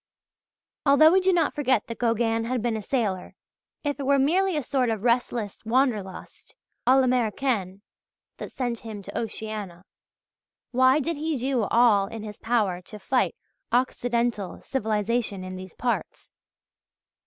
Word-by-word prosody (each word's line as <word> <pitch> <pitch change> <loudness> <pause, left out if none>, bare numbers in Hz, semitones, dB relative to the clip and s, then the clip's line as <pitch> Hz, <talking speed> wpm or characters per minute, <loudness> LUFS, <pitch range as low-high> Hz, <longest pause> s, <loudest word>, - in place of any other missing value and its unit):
Although 305 +3 +6
we 380 +2 +4
do 380 +1 +3
not 340 -4 +2
forget 260 -6 +1
that 230 - -7
Gauguin 230 -1 +1
had 245 -1 -2
been 235 -2 0
a 220 - -3
sailor, 205 -6 -2 0.5
if 290 -1 -2
it 275 - -3
were 280 0 +4
merely 350 +6 +2
a 295 - -1
sort 255 -1 0
of 220 -2 -2
restless 235 -3 0
"Wanderlust" 225 -5 -2 0.3
à 260 +2 +6
l'Americaine 235 -5 0 0.5
that - - -7
sent 245 -3 -3
him 215 -3 -8
to 200 - -10
Oceania, 215 -5 -5 0.9
why 260 +3 +4
did 325 +2 -2
he 310 0 -1
do 255 -3 0
all 215 -3 +4
in 225 0 -7
his 210 -1 -8
power 210 -6 0
to 210 +4 -11
fight 250 - 0 0.4
Occidental 235 -4 0
civilization 220 -4 -1
in 185 0 -6
these 185 -1 -9
parts? 245 -1 -3
235 Hz, 145 wpm, -25 LUFS, 210-265 Hz, 0.9 s, Although